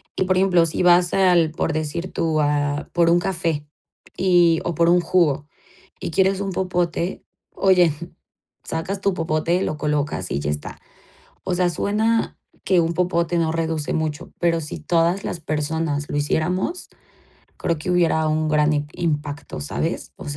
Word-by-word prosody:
Y, - - +1
por 185 0 +1
ejemplo, 185 -3 +4
si 165 - -2
vas 175 0 +4
al 180 -4 +4
por 160 0 -2
decir 155 +4 -3
tú, 160 -2 0
a 145 0 0
por 170 -1 +3
un 170 +1 +4
café 165 -5 -2 0.5
y 175 -3 +4
o 175 - -2
por 170 +2 +3
un 175 0 +4
jugo 155 -5 +1 0.5
y - - -4
quieres 190 +2 +2
un 195 -1 -2
popote, 180 -1 -2 0.3
oye, 180 -4 +4 0.7
sacas 185 +5 -4
tu 200 -1 +1
popote, 165 +2 0
lo 150 - -2
colocas 150 -10 -2
y - - 0
ya 75 +1 -2
está. 75 0 -6 0.7
O 185 - -1
sea, 180 0 +2
suena 220 +6 0 0.3
que 185 -2 +3
un 165 0 0
popote 175 -1 0
no 160 -1 +1
reduce 160 -2 -2
mucho, 155 -2 -3
pero 165 -1 +2
si 150 - -5
todas 170 +3 +1
las 170 - -4
personas 150 -1 -2
lo - - -2
hiciéramos, 180 - -1 0.7
creo 165 -2 -1
que 160 - -4
hubiera 165 -3 +2
un 155 0 0
gran 150 0 +3
im 145 0 -1
impacto, 150 - -3
¿sabes? 75 - -3
O - - -9
sea, 145 - -4
165 Hz, 170 wpm, -22 LUFS, 155-180 Hz, 0.7 s, ejemplo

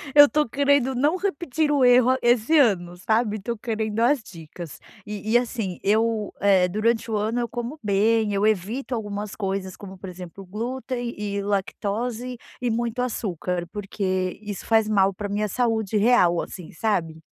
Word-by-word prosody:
eu 290 0 +10
tô 300 -2 +1
querendo 280 0 +2
não 290 +7 +2
repetir 320 -5 -1
o 275 -3 +4
erro 245 0 +6
a 260 - +2
esse 240 +6 +3
ano, 180 -9 +2
sabe, 220 +2 0
tô 235 +4 -4
querendo 220 -1 -2
as 255 +2 +3
dicas 165 -4 -10 0.3
e 210 +1 -5
e 240 - +8
assim 225 -7 -3
eu, 220 +1 +1
eh, 190 -3 +4
durante 220 +5 0
o - - 0
ano 220 +3 0
eu 235 - -1
como 240 +6 -5
bem 210 +1 +2
eu 200 +1 +1
evito 220 +7 -1
algumas 205 -2 -5
coisas, 195 -2 -3
como 190 -2 -10
por 190 - -8
exemplo, 180 +1 -9
o 185 - -17
glúten 240 +3 -4
e 200 -1 -3
lactose 215 +5 -2 0.2
e 245 - 0
muito 235 +1 -2
açúcar, 180 -7 -2
porque 190 -2 -2
isso 205 -2 -6
faz 220 -1 +3
mal 195 -2 +3
pra 205 +2 -5
minha 210 +1 -1
saúde 220 -2 0
real 200 -6 +4
assim, 180 -4 -9
sabe. 165 -5 -1
215 Hz, 175 wpm, -24 LUFS, 195-245 Hz, 0.3 s, eu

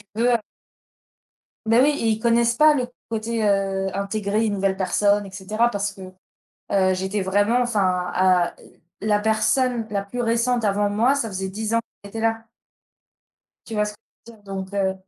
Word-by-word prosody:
tu 225 - -2
veux 245 - +4 1.4
Beh, 225 +2 +4
oui 280 +3 +5
et 230 - -1
ils 220 -1 +1
connaissent 235 +1 +2
pas 305 +2 +6
le 250 -3 -1 0.2
côté, 225 0 -2
heu, 195 -1 +1
intégrer 200 +2 -1
une 210 - -1
nouvelle 195 -1 0
personne 205 +2 +2
et 195 - -10
cetera 210 +5 0
parce 205 -1 -2
que, 195 - -15 0.7
heu, 190 -2 +3
j'étais 190 +3 -2
vraiment, 205 +5 +2
enfin, 185 -7 0
à 185 -1 +3 0.5
la 210 0 +2
personne 225 +2 +1
la 200 -1 -1
plus 245 +5 -4
récente 235 +1 +1
avant 205 0 +1
moi, 225 +7 +2
ça 280 -5 -1
faisait 190 -1 -4
10 215 +3 -3
ans 230 - +3 0.2
qu'il 200 - -10
était 225 +2 -6
là. 225 0 -1 1.2
Tu 225 - -7
vois 210 0 +2
ce 210 - -4
que 210 - -19 0.3
je - - -10
veux - - -17
dire? - - -26
Donc 195 0 -6
heu, 190 -1 +1
210 Hz, 185 wpm, -23 LUFS, 195-230 Hz, 1.4 s, pas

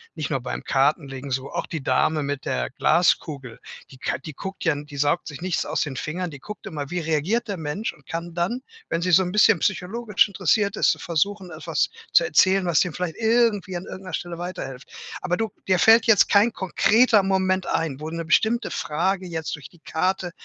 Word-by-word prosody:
nicht 155 -3 -3
nur 135 -3 0
beim 125 - -5
Kartenlegen 135 -1 0
so, 130 +2 -2
auch - - -3
die 160 -4 -6
Dame 145 +4 +1
mit 140 -1 -4
der 60 -1 -1
Glaskugel, 150 -6 +1 0.3
die 130 - -13
k - - -2
die 150 +3 -9
guckt 190 +7 -7
ja 165 - +3
n 145 0 -4
die 145 -1 -12
saugt 145 +4 +1
sich 150 +1 -8
nichts 185 -1 -1
aus - - -1
den 135 -4 -3
Fingern, 175 +3 -3
die 145 - -10
guckt 210 +8 -9
immer, 145 -3 -5
wie 180 - -2
reagiert 165 +10 0
der 200 - -2
Mensch 160 +8 -3
und 140 - -22
kann 170 +1 -5
dann, 190 +9 -1 0.3
wenn 165 - -1
sie 180 +1 0
so 190 +3 +6
'n 180 - -3
bisschen 210 -3 +5
psychologisch 210 +2 +1
interessiert 200 +1 +1
ist, - - +3
versuchen, 185 +3 -1
etwas 160 0 -1 0.2
zu - - +7
erzählen, 195 -5 +3
was 170 -4 +3
dir 175 -4 +1
vielleicht 180 -3 -4
irgendwie 220 -5 +2
an 175 - -4
irgend 190 - -9
'ner 185 - -8
Stelle 175 -1 -4
weiterhilft. 170 -7 -6 0.3
Aber 180 - 0
du 225 +3 -2 0.2
dir 185 -1 +4
fällt 225 +3 +6
jetzt 225 -4 +5
kein 210 +3 +4
konkreter 215 +4 +3
Moment 190 -1 +1
ein, 150 -5 -1
wo 155 +1 -5
'ne 165 0 -4
bestimmte 225 +7 +2
Frage 185 +5 -1
jetzt 160 -2 -4
durch 145 - -12
die 175 - -22
Karte 180 +2 -1
175 Hz, 210 wpm, -24 LUFS, 150-195 Hz, 0.3 s, zu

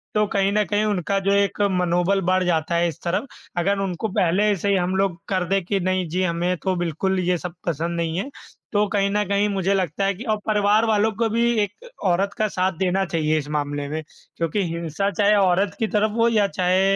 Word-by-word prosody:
तो 210 0 +3
कहीं 195 0 +2
न 210 0 +3
कहीं 210 0 0
उनका 195 -1 0
जो - - +4
एक 200 +1 +1
मनोबल 180 +2 +1
बढ़ 185 +1 +2
जाता 170 0 0
है 170 0 +2
इस 160 - -6
तरफ, 185 +8 -1 0.3
अगर 200 +3 +1
उनको 195 +2 -2
पहले 200 +3 +3
से 200 +4 -1
ही 200 - +3
हम 185 +1 0
लोग 190 -3 0
कर 185 -2 +1
दें 195 -2 +1
कि 195 +1 0
नहीं 185 -1 0
जी, 180 +3 -1
हमें 175 +1 0
तो 190 -1 0
बिल्कुल 175 +3 -1
ये 180 0 +1
सब 175 0 -6
पसंद 170 +2 -1
नहीं 165 0 -1
है, 220 +9 -3 0.4
तो 205 +1 +3
कहीं 200 -1 +2
न 210 0 +1
कहीं 200 +1 +2
मुझे 195 0 0
लगता 190 0 0
है 200 - +1
कि 225 - -8
और 215 -3 0
परिवार 210 +1 +3
वालों 220 0 +2
को 225 - +2
भी 235 +2 +2
एक 465 - -8 0.2
औरत 195 +3 0
का 215 - +1
साथ 185 -1 0
देना 190 +1 +1
चाहिए 155 -2 0
इस 145 0 -7
मामले 145 0 -3
में 155 +1 -3 0.4
क्योंकि 170 +4 0
हिंसा 170 +4 -2
चाहे 205 +3 +3
औरत 195 0 +2
की 220 - +1
तरफ 210 0 +1
हो 230 - +5
या 210 -3 +3
चाहे 190 +1 +2
190 Hz, 225 wpm, -22 LUFS, 175-205 Hz, 0.4 s, हो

